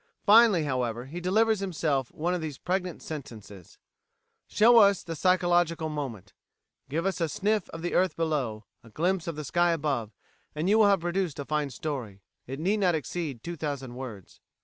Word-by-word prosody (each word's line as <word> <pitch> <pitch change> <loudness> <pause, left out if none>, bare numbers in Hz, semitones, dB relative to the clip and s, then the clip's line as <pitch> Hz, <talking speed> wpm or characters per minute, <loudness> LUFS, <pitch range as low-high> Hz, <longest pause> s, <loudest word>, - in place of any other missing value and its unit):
Finally, 215 -5 +6
however, 125 -4 -2
he 160 +6 -7
delivers 215 +4 +2
himself 155 -9 -1
of 175 +2 -1
these 150 -4 -5
pregnant 180 -1 -3
sentences: 105 - -9 0.7
"Show 230 +2 +6
us 200 -3 +5
the 165 - -5
psychological 175 -2 +2
moment; 120 - -6 0.6
give 165 +5 -2
us 195 -2 -1
a 165 - +1
sniff 210 +6 0
of 165 0 -8
the 175 - -2
earth 185 0 +2
below; 135 -10 -2 0.2
a 115 - -15
glimpse 175 - -1
of 165 - -3
the 150 0 -6
sky 175 +4 +2
above; 140 -9 -1 0.5
and 155 +4 -1
you 215 +3 +4
will 215 - +6
have 200 -3 +3
produced 175 -2 -1
a 140 - -5
fine 150 -1 -1
story. 120 -8 -6 0.2
It 135 +3 -6
need 195 +7 +1
not 185 -5 +2
exceed 150 -4 -4
two 175 0 -5
thousand 140 -5 -4
words." 120 -7 -9
160 Hz, 175 wpm, -28 LUFS, 135-185 Hz, 0.7 s, Finally